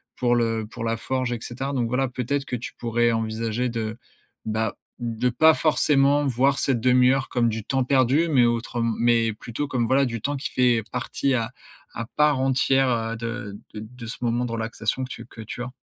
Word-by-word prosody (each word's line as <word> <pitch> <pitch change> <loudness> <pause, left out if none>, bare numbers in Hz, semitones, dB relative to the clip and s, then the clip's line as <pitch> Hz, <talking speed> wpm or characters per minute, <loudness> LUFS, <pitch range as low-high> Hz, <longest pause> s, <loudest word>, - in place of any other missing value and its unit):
pour 120 -1 +2
le 115 -2 0
pour 115 - -6
la 115 0 0
forge 130 +1 -2
et 120 - -4
cetera. 135 +4 -4
Donc 120 -4 0
voilà, 130 +2 +1
peut-être 130 +3 -2
que 125 - -3
tu 120 - -7
pourrais 120 0 +1
envisager 115 +2 -1
de, 110 -1 -3 0.5
bah, 110 -1 -1 0.2
de 120 +1 -1
pas 160 +7 +5
forcément 145 -2 +3
voir 135 +2 +2
cette 125 -4 +1
demi-heure 125 +2 +4
comme 120 -2 +1
du 110 0 -3
temps 135 +1 +1
perdu 135 +5 +3
mais 130 -6 +5
autrem 115 -1 0
mais 115 -1 +3
plutôt 120 +6 -5
comme, 125 -5 0
voilà, 135 +1 +3
du 115 -3 -4
temps 145 +6 -1
qui 135 - -4
fait 120 -3 +3
partie 140 -1 -1
à 115 -3 -1 0.4
à 115 - -4
part 150 -2 +4
entière, 135 0 +3
heu, 115 -1 -1
de 115 -3 -5 0.2
de 105 - -6
de 115 +2 -10
ce 115 - -6
moment 120 0 0
de 120 - -5
relaxation 115 +2 -2
que - - -12
tu - - -8
que 115 - -12
tu 115 +3 -6
as. 125 - -6
120 Hz, 205 wpm, -24 LUFS, 115-130 Hz, 0.5 s, pas